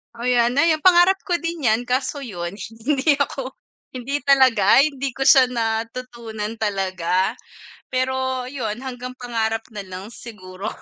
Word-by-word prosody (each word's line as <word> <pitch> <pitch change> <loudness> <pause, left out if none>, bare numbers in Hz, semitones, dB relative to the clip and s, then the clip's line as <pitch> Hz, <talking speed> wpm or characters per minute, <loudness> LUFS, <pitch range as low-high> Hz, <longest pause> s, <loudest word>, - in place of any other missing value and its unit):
O, 235 - -8
'yan 245 -1 +2
ayun 320 0 +3
pangarap 365 +1 +6
ko 360 - 0
din 335 -4 -3
yan 220 +2 +2
kaso 265 +3 -1
yun, 175 -7 -5
hindi 265 +7 0
ako, 270 -2 -2 0.4
hindi 260 +3 -3
talaga 260 -7 +5
hindi 275 -2 +1
ko 270 +2 -3
siya 265 - +8
natutunan 230 -1 -4
talaga. 190 -1 -1 0.6
Pero 260 0 -1
yun, 245 -4 -4
hanggang 250 -1 -6
pangarap 225 -2 -2
na 205 - -5
lang 185 0 -9
siguro. 195 -4 -8
245 Hz, 140 wpm, -21 LUFS, 220-270 Hz, 0.6 s, siya